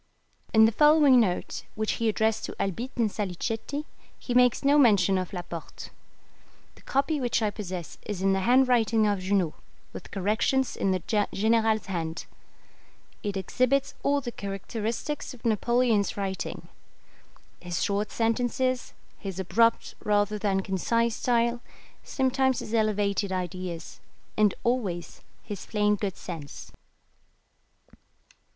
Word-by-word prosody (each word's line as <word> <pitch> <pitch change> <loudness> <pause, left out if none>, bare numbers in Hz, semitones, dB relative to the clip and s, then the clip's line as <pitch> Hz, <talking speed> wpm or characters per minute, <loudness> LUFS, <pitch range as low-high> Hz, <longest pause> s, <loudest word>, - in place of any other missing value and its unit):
In 220 0 +7
the 220 - +4
following 295 0 +6
note, 185 -6 0
which 215 0 -1
he 230 - +3
addressed 220 +1 0
to - - -7
Albitte 230 +7 -3
and 225 -3 +1
Salicetti, 225 - -3 0.3
he 245 - -4
makes 250 0 +4
no 285 +2 +5
mention 200 -7 +5
of 185 - -4
Laporte. 175 -3 -7 0.8
The - - -20
copy 280 +2 0
which 240 -2 0
I 210 - +1
possess 185 -6 -6
is 205 -3 -3
in 195 +1 +2
the 195 - +1
handwriting 240 -1 +3
of 205 -2 +1
Junot, 185 -3 0 0.4
with - - -9
corrections 220 +7 0
in 195 - 0
the 185 -3 0 0.3
General's 220 0 +2
hand. 165 -4 -4 1.0
It 205 -1 -3
exhibits 255 +8 +1
all 285 0 +1
the 245 -2 -5
characteristics 225 +8 -4
of 240 - -19
Napoleon's 230 -1 +2
writing: 195 -1 -4 0.9
his 175 0 -3
short 205 +1 0
sentences, 245 +2 0 0.3
his 195 -2 -6
abrupt 230 +5 +2
rather 210 0 +1
than 195 -2 +1
concise 230 +5 0
style, 235 0 +1 0.4
sometimes 265 -1 +1
his 215 - -6
elevated 205 -2 +1
ideas, 180 -2 -5 0.4
and 210 -2 +3
always 205 -9 -2 0.2
his 205 -3 -6
plain 210 -1 +2
good 200 -2 -3
sense. 155 -5 -8
215 Hz, 130 wpm, -27 LUFS, 195-240 Hz, 1.0 s, In